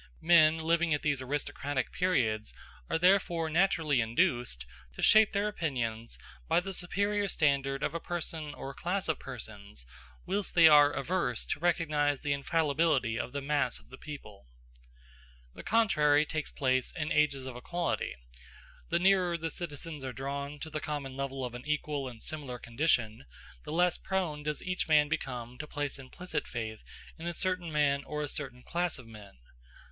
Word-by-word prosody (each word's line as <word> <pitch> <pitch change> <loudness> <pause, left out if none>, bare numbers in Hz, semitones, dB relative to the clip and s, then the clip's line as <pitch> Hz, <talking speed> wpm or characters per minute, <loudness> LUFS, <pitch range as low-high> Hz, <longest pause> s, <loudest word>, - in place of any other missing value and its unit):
Men 160 -2 +6
living 165 0 +2
at 145 - -5
these 145 -3 +1
aristocratic 140 0 -2
periods 115 -12 +1 0.3
are - - +2
therefore 175 -2 +3
naturally 160 -6 +3
induced 120 - +1 0.3
to - - -6
shape 215 0 +7
their 205 0 +1
opinions 120 - -2 0.3
by - - +4
the 190 +2 -5
superior 200 +3 0
standard 140 -5 +1
of - - 0
a 170 - -2
person 160 -3 -4
or 135 - -6
a - - -13
class 185 +5 -2
of 160 -3 0
persons, 105 - -8 0.4
whilst 200 +1 -1
they 165 -2 +9
are 145 -1 +8
averse 140 -5 -1
to - - -2
recognize 150 -4 +1
the 145 -2 0
infallibility 140 -5 +1
of - - -3
the 140 0 -4
mass 145 -4 +1
of - - -18
the 130 - -9
people. 105 - -10 1.1
The - - -9
contrary 150 -10 +3
takes 155 0 -3
place 130 -2 +1
in 150 -2 -2
ages 140 -3 +2
of 130 -2 -6
equality. 170 +8 -2 0.7
The 170 - +2
nearer 180 -1 +3
the 165 -1 -3
citizens 155 -3 -6
are 130 - -3
drawn 140 +2 -4
to 160 - -6
the 155 - -2
common 145 -3 -4
level 135 -1 -3
of 120 - -6
an 120 +3 -8
equal 150 -2 -1
and 115 -3 -10
similar 145 -6 -5
condition, 115 - 0 0.4
the - - -6
less 175 +2 +2
prone 180 -6 -2
does 150 0 -3
each 185 0 -1
man 150 -2 +5
become 125 -5 -4
to 155 - -5
place 145 -2 -3
implicit 150 +4 -5
faith 110 -3 -4 0.4
in 165 - -5
a 175 - -3
certain 185 -3 -1
man 145 -2 +2
or 150 0 -3
a - - -2
certain 135 -3 -6
class 175 0 -1
of 125 - -11
men. 105 - -13
150 Hz, 170 wpm, -31 LUFS, 130-170 Hz, 1.1 s, they